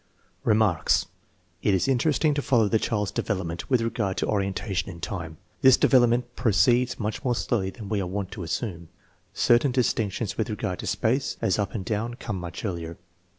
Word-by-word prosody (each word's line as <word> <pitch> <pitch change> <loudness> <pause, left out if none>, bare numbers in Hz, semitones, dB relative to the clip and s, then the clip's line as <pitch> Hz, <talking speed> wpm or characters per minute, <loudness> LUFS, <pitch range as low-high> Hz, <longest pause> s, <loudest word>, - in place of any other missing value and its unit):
Remarks. 105 -7 +3 0.6
It 100 - +3
is 95 - +1
interesting 150 +3 +2
to 145 - -1
follow 115 -6 +3
the 110 +2 +2
child's 105 -3 -1
develop 95 -4 -2
ment 85 +1 -6
with 125 -3 +3
regard 105 -4 -1
to - - 0
orientation 100 -2 -1
in 85 -3 -9
time. 85 -2 -5 0.2
This 130 -1 +7
develop 125 -3 +5
ment 120 +1 -1
proceeds 120 +3 +2
much 105 -1 -3
more 125 -2 +1
slowly 105 -5 -1
than 105 +1 -9
we 105 -1 -1
are 90 - -3
wont 95 +1 -4
to 100 - -7
assume. 85 -1 -4 0.5
Certain 120 +3 +4
distinctions 115 -4 -1
with 110 - 0
regard 95 -4 -3
to - - -5
space, 130 +4 0
as 95 - +1
up 100 0 -2
and 95 -4 -3
down, 115 +4 -2
come 105 -6 -5
much 90 +5 -6
earlier. 85 -4 -4
105 Hz, 190 wpm, -26 LUFS, 95-120 Hz, 0.6 s, This